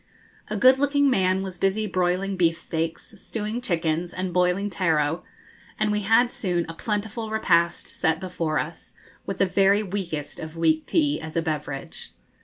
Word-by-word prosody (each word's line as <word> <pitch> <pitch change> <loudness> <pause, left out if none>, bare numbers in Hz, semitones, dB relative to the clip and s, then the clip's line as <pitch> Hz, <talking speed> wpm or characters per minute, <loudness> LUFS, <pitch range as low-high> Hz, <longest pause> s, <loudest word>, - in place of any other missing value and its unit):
A 215 - -3
good 255 +5 +6
looking 285 0 +3
man 190 -4 +2
was 185 -2 -7
busy 195 +3 +1
broiling 185 0 0
beef 165 -2 +2
steaks, 165 +5 -4
stewing 220 +2 -4
chickens, 170 -4 -1
and 185 -1 -3
boiling 180 +3 +2
taro, 160 -3 +1 0.5
and 215 0 +1
we 210 - +1
had 225 +4 +3
soon 175 -4 -1
a 165 - -6
plentiful 215 +4 -3
repast 170 -6 +2
set 160 -1 0
before 170 -4 -2
us, 160 +2 -5 0.3
with 195 - -3
the 195 - +3
very 195 +2 +3
weakest 175 -7 -4
of 160 +1 -7
weak 160 -1 +2
tea 300 -3 +1
as 160 +1 -6
a - - +3
beverage. 150 -4 -5
185 Hz, 165 wpm, -25 LUFS, 165-210 Hz, 0.5 s, good